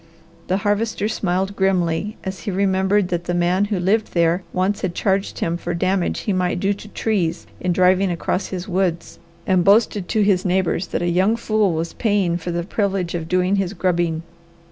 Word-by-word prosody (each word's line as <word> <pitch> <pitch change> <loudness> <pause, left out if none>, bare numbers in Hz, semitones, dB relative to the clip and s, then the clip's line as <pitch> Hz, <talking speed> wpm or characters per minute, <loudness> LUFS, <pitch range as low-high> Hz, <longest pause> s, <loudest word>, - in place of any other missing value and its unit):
The 185 - +1
Harvester 205 +1 0
smiled 195 -2 -1
grimly 190 +1 0
as 190 -1 -5
he 180 - -5
remembered 190 0 +1
that 175 -1 -2
the 175 - -1
man 175 +3 +2
who 205 -2 -2
lived 205 +4 0
there 170 +1 +3
once 190 +3 0
had 175 -2 -2
charged 195 0 0
him 170 +1 -1
for 175 0 -4
damage 185 +1 0
he 205 - -1
might 180 -1 0
do 195 +2 +1
to 200 +1 -11
trees 190 -6 -1
in 180 - -1
driving 185 +2 +3
across 175 +2 -2
his 185 -1 -5
woods, 180 -3 -1 0.3
and 185 -3 +3
boasted 205 -1 +3
to 215 - +2
his 195 -3 +2
neighbours 185 -1 0
that - - -2
a - - 0
young 185 +6 +2
fool 215 -5 +1
was 165 +1 -3
paying 200 -6 +1
for 175 +1 -6
the 170 0 -1
privilege 195 -2 -1
of 165 -2 -3
doing 185 +3 +1
his 195 -1 -1
grubbing. 170 -4 0
185 Hz, 190 wpm, -21 LUFS, 175-200 Hz, 0.3 s, there